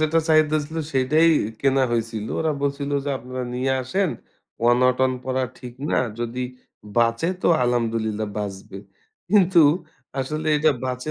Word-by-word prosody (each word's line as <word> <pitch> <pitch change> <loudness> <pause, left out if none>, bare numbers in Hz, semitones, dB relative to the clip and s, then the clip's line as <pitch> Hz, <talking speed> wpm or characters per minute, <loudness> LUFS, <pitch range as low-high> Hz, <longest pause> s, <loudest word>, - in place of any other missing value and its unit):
যেটা 155 +1 +2
চাহিদা 155 -1 +5
দিছিল 155 +2 -4 0.2
সেটাই 150 +5 +3 0.3
কেনা 135 -1 +3
হইছিল, 115 -2 -2
ওরা 160 -1 +1
বলছিল 140 0 -2
যে," 145 - -2
আপনারা 130 0 -6
নিয়ে 130 +2 0
আসেন, 185 +7 0 0.6
অনটন 125 +1 +3
পরা 130 0 -1 0.2
ঠিক 125 -2 -9 0.2
না, - - +2 0.2
যদি 120 +1 -3 0.6
বাঁচে 115 +7 +2
তো - - +3
আলহামদুলিল্লাহ 115 -3 0
বাঁচবে।" 95 -1 -6 0.5
কিন্তু 190 -4 +5 0.6
আসলে 155 +4 -3
এটা 155 +1 +4
বাঁচে 125 +3 -3
130 Hz, 135 wpm, -23 LUFS, 120-155 Hz, 0.6 s, চাহিদা